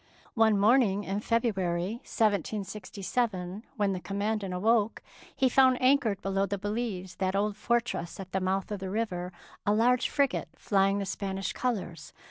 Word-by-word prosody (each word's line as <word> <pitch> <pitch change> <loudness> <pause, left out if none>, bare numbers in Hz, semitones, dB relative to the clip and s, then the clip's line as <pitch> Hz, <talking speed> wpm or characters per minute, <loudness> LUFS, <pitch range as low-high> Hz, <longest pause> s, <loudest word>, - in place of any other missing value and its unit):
One 220 -2 +4
morning 205 -1 +4
in 195 +1 -2
February, 210 -2 0
1767, 205 -1 -2
when 205 -2 +1
the 185 - -3
Commandant 200 +1 -2
awoke, 215 +4 +1 0.3
he 265 - +3
found 260 0 +4
anchored 255 -7 +2
below 195 0 0
the 200 +1 -2
Belize, 205 -3 -4
that 190 0 0
old 205 +1 +1
fortress 220 -4 -1
at 190 -1 -8
the 190 - -1
mouth 190 +2 -1
of 205 - -3
the 190 0 -5
river, 185 -4 -2 0.3
a 205 -1 +2
large 245 +3 +3
frigate 280 -2 0
flying 195 -1 +2
the 200 - -2
Spanish 195 0 -3
colours. 185 -11 -3
205 Hz, 150 wpm, -29 LUFS, 190-230 Hz, 0.3 s, One